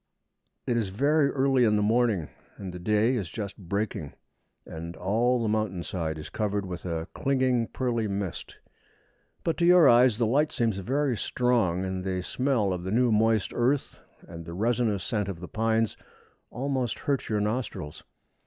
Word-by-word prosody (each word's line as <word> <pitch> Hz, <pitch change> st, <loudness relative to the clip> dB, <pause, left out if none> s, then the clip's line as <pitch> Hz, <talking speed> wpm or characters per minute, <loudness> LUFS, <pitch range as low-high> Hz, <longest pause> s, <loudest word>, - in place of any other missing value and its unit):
It 120 Hz, -, 0 dB
is 110 Hz, -4 st, -1 dB
very 140 Hz, +8 st, +2 dB
early 135 Hz, -2 st, +2 dB
in 105 Hz, -2 st, +4 dB
the 105 Hz, -, +2 dB
morning, 110 Hz, -6 st, +1 dB, 0.3 s
and 95 Hz, -2 st, -7 dB
the 90 Hz, -, -7 dB
day 105 Hz, +7 st, +2 dB
is 100 Hz, -8 st, -3 dB
just 100 Hz, +2 st, -5 dB
breaking, 100 Hz, -5 st, -3 dB, 0.5 s
and 85 Hz, +1 st, -7 dB
all 115 Hz, +7 st, +1 dB
the -, -, 0 dB
mountain 105 Hz, -5 st, -1 dB
side 80 Hz, -4 st, -3 dB
is 75 Hz, -, -8 dB
covered 105 Hz, -2 st, -1 dB
with 90 Hz, -1 st, -7 dB
a 85 Hz, -1 st, -3 dB
clinging 130 Hz, -3 st, +1 dB
pearly 120 Hz, -4 st, -1 dB
mist; 100 Hz, -3 st, -5 dB, 0.9 s
but 165 Hz, -, 0 dB
to 170 Hz, -, +2 dB
your 175 Hz, -4 st, +7 dB
eyes 120 Hz, -2 st, +5 dB
the 115 Hz, -, +2 dB
light 145 Hz, +7 st, +2 dB
seems 115 Hz, -5 st, 0 dB
very 135 Hz, +6 st, 0 dB
strong, 105 Hz, -6 st, +1 dB
and 95 Hz, -1 st, -3 dB
the 95 Hz, -1 st, -2 dB
smell 125 Hz, -5 st, 0 dB
of 90 Hz, -, -4 dB
the 95 Hz, -, -4 dB
new 120 Hz, +3 st, +2 dB
moist 110 Hz, -1 st, +2 dB
earth 130 Hz, +4 st, 0 dB, 0.3 s
and 85 Hz, -1 st, -8 dB
the 85 Hz, 0 st, -7 dB
resinous 110 Hz, -2 st, 0 dB
scent 105 Hz, -1 st, -2 dB
of 90 Hz, -4 st, -5 dB
the 90 Hz, -, -7 dB
pines 110 Hz, 0 st, 0 dB, 0.5 s
almost 130 Hz, -2 st, -2 dB
hurt 140 Hz, -2 st, -1 dB
your 105 Hz, -1 st, +1 dB
nostrils. 105 Hz, -, -3 dB
110 Hz, 170 wpm, -27 LUFS, 95-125 Hz, 0.9 s, your